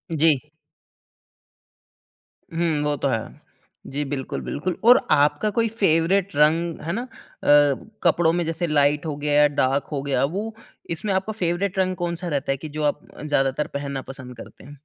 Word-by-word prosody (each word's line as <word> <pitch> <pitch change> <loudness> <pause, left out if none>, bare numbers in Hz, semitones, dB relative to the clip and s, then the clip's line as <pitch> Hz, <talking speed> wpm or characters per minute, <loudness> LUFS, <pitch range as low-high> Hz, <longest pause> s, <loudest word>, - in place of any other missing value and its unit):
जी। 155 -3 +4 2.1
हुँ, 165 -2 0
वो 150 0 +1
तो 140 - -1
है। 110 -2 -4 0.5
जी 145 +2 -2
बिल्कुल, 135 -1 -4
बिल्कुल 175 +4 -3
और 245 +2 +9
आपका 150 +8 +3
कोई 230 0 +3
फेवरेट 180 +1 +2
रंग, 160 +3 +2
है 165 - -3
ना? 230 - -2
अ, 255 - -7 1.0
कपड़ो 170 -1 +4
में 175 -1 0
जैसे 165 +1 -2
लाइट 145 0 +2
हो 155 -2 -3
गया, 150 0 +4
डार्क 140 -1 0
हो 140 -2 -2
गया, 135 -2 0
वो 205 +9 -2 0.4
इसमें 190 +4 -2
आपका 190 +3 -1
फेवरेट 180 +3 0
रंग 185 0 +1
कौन-सा 175 +1 -3
रहता 140 -4 -1
है 135 - -1
कि 155 +3 -8
जो 150 +1 -4
आप 150 0 -1 0.2
ज़्यादातर 145 -1 0
पहनना 140 -1 -4
पसंद 130 -2 -10
करते - - -12
हैं? 145 +1 -11
155 Hz, 165 wpm, -23 LUFS, 145-175 Hz, 2.1 s, और